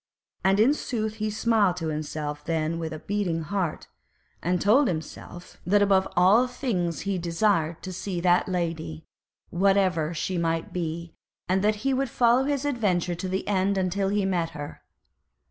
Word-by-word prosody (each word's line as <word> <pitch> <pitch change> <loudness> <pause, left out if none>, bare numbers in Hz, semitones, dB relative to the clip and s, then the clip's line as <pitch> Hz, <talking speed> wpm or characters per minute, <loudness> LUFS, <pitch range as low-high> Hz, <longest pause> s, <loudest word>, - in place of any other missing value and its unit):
And 195 +1 +3
in 240 +7 +5
sooth 220 -6 -3
he 215 0 -1
smiled 210 -4 +2
to 165 -2 -2
himself 150 -1 -4
then 165 0 -1
with 160 -1 -4
a 155 - -5
beating 180 -3 -2
heart, 180 0 -2 0.6
as 180 - 0
he - - +3
told 225 - +4
himself 175 +1 -6
that 205 +3 +3
above 195 -1 +3
all 200 +8 +5
things 185 - -2
he 195 -1 -2
desired 170 -1 0
to 185 - -5
see 185 0 -4
that 175 +1 +3
Lady, 165 - -3 0.5
whatever 185 -4 +2
she 175 +2 -2
might 165 -1 -1
be, 170 -1 -4 0.3
and 190 +2 +1
that 210 +1 +3
he 270 - +3
would 265 0 0
follow 240 +2 +3
his 285 -1 -1
adventure 195 -10 0
to 185 +2 -4
the 190 +1 -2
end 195 0 +1
until 190 +1 0
he 205 -1 +1
met 175 -4 0
her. 145 0 -7
185 Hz, 170 wpm, -26 LUFS, 165-205 Hz, 0.6 s, in